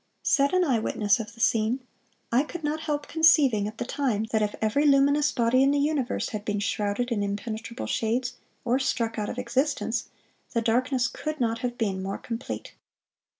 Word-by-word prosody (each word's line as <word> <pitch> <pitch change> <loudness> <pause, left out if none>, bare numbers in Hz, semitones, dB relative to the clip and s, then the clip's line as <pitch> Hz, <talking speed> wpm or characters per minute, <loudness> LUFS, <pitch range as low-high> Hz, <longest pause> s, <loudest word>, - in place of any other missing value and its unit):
(487) - - 0
Said 280 +5 +3
an 260 - +3
eye 225 - 0
witness 205 +1 +1
of 225 +1 -7
the - - -17
scene: 225 +2 +2 0.5
"I 240 +3 +4
could 320 +3 -7
not 300 +1 -1
help 295 -2 -3
conceiving 285 -10 +4
at 215 +1 -8
the - - -3
time, 245 -5 -1
that 220 - +2
if 210 -1 -1
every 220 +7 +1
luminous 285 +1 +4
body 240 +2 +2
in 270 - +5
the 285 - +2
universe 285 -3 0
had 215 -3 -5
been 205 -1 -1
shrouded 205 +4 -1
in 215 -3 0
impenetrable 220 +4 -4
shades, 240 +2 -1 0.3
or 250 +2 +2
struck 230 -4 -1
out 210 - -2
of - - -5
existence, 250 -1 -1 0.5
the 230 - +3
darkness 250 +2 +1
could 310 -1 -5
not 230 -2 0
have 245 -1 -3
been 195 -4 -1
more 195 +1 -3
complete." 230 +1 -6
240 Hz, 195 wpm, -26 LUFS, 220-275 Hz, 0.5 s, in